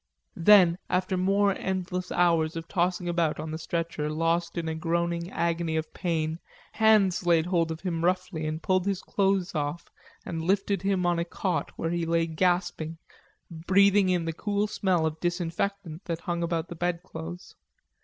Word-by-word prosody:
Then 180 -2 +6
after 185 +1 0
more 195 +2 +2
endless 185 -1 -3
hours 165 -2 +2
of 165 0 -5
tossing 180 -1 0
about 170 -3 0
on 155 +1 -5
the 160 - -4
stretcher, 165 -3 -2
lost 165 +3 0
in 165 -1 -2
a 160 - -1
groaning 170 +1 -1
agony 170 -2 -1
of 160 0 -4
pain, 160 -2 -2 0.3
hands 210 -5 +3
laid 165 -2 +4
hold 170 -2 +1
of 160 - -6
him 170 -3 -2
roughly 180 -3 0
and 155 +1 -4
pulled 185 0 +1
his 195 -2 -1
clothes 195 -2 0
off 150 +1 -3 0.3
and 165 -2 -4
lifted 195 +2 +1
him 195 -2 0
on 175 -1 +2
a - - +1
cot 180 +2 -2
where 165 - -2
he 170 -1 -1
lay 165 0 +2
gasping, 175 -1 0 0.5
breathing 190 +4 +3
in 175 -2 +1
the 165 - -2
cool 205 +4 -1
smell 185 -5 0
of 160 0 -2
disinfectant 175 0 -3
that 165 -1 -3
hung 170 -1 -2
about 170 0 -2
the 175 - -6
bedclothes. 175 0 -5
175 Hz, 170 wpm, -27 LUFS, 165-185 Hz, 0.5 s, Then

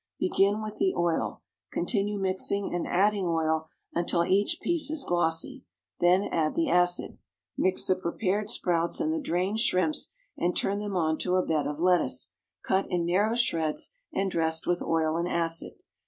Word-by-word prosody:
Begin 200 +3 +2
with 215 0 -6
the 190 - +1
oil. 170 -1 -1 0.3
Continue 205 -2 -1
mixing 195 +1 -1
and 175 - -2
adding 200 +1 +2
oil, 160 -1 0 0.2
until 170 0 +1
each 205 - +2
piece 340 -4 +1
is 310 -2 +3
glossy. 165 -2 0 0.4
Then 180 +3 +4
add 155 -2 0
the 330 -3 +1
acid. 180 0 +2 0.4
Mix 185 0 +1
the 185 - +3
prepared 190 +3 -2
sprouts 170 -1 0
and 315 0 0
the 325 - -1
drained 190 - -1
shrimps, 230 +8 +1 0.2
and 175 +1 -1
turn 200 +1 0
them 205 -2 -4
onto 165 +2 0
a 185 - +2
bed 150 -3 0
of 145 0 -4
lettuce, 180 +1 +2 0.3
cut 190 +1 +1
in 175 -1 0
narrow 205 +6 +2
shreds, 165 -10 0 0.2
and 195 0 -1
dressed 160 -1 0
with 175 0 0
oil 160 -1 0
and 170 +1 -1
acid. 165 -1 -1
180 Hz, 165 wpm, -28 LUFS, 170-200 Hz, 0.4 s, Then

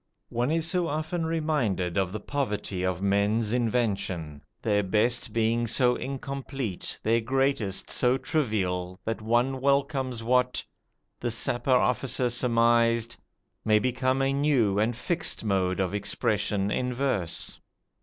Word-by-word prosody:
One 120 +3 -1
is 160 0 +1
so 175 0 +1
often 160 +2 -2
reminded 140 - 0
of 95 -2 +1
the 110 - -4
poverty 105 -8 -3
of 95 0 -1
men's 105 +3 +1
invention, 100 - -1 0.2
their 105 -3 +1
best 110 +5 +1
being 115 +1 +1
so 125 +2 +4
incomplete, 135 -5 -5
their 115 +2 +2
greatest 130 -5 0
so 125 +1 +3
trivial, 95 - -1
that 115 0 -2
one 120 +4 +1
welcomes 135 -3 0
what 125 +1 +1 0.5
this 120 -2 -1
Sapper 120 +3 +1
officer 125 0 0
surmised 115 -1 +2 0.5
may 110 0 +4
become 130 +3 +1
a 135 0 +1
new 135 -9 +2
and 110 +2 +1
fixed 165 +4 -1
mode 95 -3 0
of 95 0 0
expression 105 -1 0
in 125 +3 -1
verse. 120 -11 -1
120 Hz, 130 wpm, -27 LUFS, 105-135 Hz, 0.5 s, so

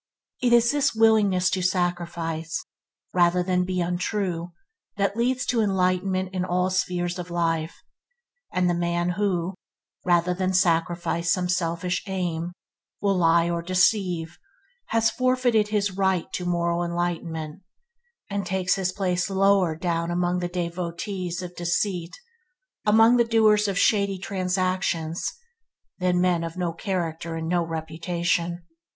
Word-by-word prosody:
It 245 - +2
is 235 0 +5
this 290 -5 +1
willingness 210 -5 +4
to 185 - 0
sacrifice 170 -3 -2 0.5
rather 180 0 +3
than 180 0 +1
be 185 -1 -1
untrue 180 0 -2 0.5
that 200 0 +1
leads 250 +2 0
to 235 -2 +1
enlightenment 185 -1 0
in 185 -1 -1
all 180 +1 0
spheres 180 -1 -1
of 175 0 -6
life; 165 -2 -1 0.8
and 180 -1 +1
the 175 - +2
man 175 0 0
who, 185 -1 -1 0.5
rather 175 0 +2
than 185 +1 -1
sacrifice 170 -1 +1
some 180 -1 +1
selfish 175 0 -1
aim, 175 -3 -2 0.5
will 200 -1 +1
lie 170 -1 +4
or 170 0 -1
deceive, 180 -2 +1 0.5
has 225 -1 +2
forfeited 255 -4 +2
his 205 -1 0
right 190 -2 +1
to 180 - -3
moral 170 0 0
enlightenment, 170 -1 -3 0.7
and 200 0 -2
takes 185 0 +1
his 190 -2 -1
place 180 -1 -1
lower 195 -3 +3
down 170 0 -1
among 175 +1 0
the 175 - -2
devotees 175 +1 -4
of 180 0 -8
deceit, 175 0 -1 0.7
among 225 +3 +6
the 240 - +5
doers 215 -2 +3
of 195 -2 -1
shady 200 -2 +2
transactions, 185 -3 -1 0.7
than 180 -1 +2
men 180 -2 +2
of 165 +1 -6
no 175 -2 -1
character 170 -2 -3
and 160 0 -4
no 175 0 +1
reputation. 170 +2 -2
180 Hz, 135 wpm, -25 LUFS, 170-190 Hz, 0.8 s, among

